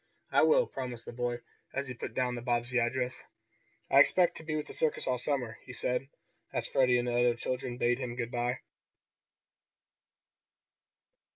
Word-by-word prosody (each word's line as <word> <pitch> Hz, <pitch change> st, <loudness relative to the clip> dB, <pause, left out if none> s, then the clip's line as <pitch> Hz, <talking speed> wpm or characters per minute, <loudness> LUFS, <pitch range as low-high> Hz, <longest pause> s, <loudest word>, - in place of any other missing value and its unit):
"I -, -, +5 dB
will," -, -, +5 dB
promised 125 Hz, -, -6 dB
the -, -, -6 dB
boy, 120 Hz, 0 st, -2 dB, 0.3 s
as 140 Hz, 0 st, -1 dB
he 130 Hz, -, -4 dB
put 120 Hz, -1 st, -7 dB
down 125 Hz, -1 st, +1 dB
the 120 Hz, -, -4 dB
Bobbsey 120 Hz, 0 st, +1 dB
address. 125 Hz, +2 st, -1 dB, 0.7 s
"I 135 Hz, -, +7 dB
expect 175 Hz, +5 st, +5 dB
to -, -, -9 dB
be 155 Hz, -1 st, -2 dB
with 150 Hz, -, -2 dB
this -, -, -11 dB
circus 155 Hz, -, +1 dB
all 125 Hz, -1 st, 0 dB
summer," 125 Hz, -4 st, -2 dB
he 125 Hz, -, -10 dB
said, 125 Hz, +2 st, -1 dB, 0.4 s
as -, -, 0 dB
Freddie 125 Hz, -2 st, +4 dB
and 120 Hz, 0 st, 0 dB
the 120 Hz, -, 0 dB
other 120 Hz, 0 st, +4 dB
children 125 Hz, 0 st, -3 dB
bade 120 Hz, +1 st, +2 dB
him 125 Hz, -2 st, -4 dB
good 120 Hz, -1 st, -3 dB
bye. 120 Hz, 0 st, -1 dB
125 Hz, 175 wpm, -31 LUFS, 120-130 Hz, 0.7 s, I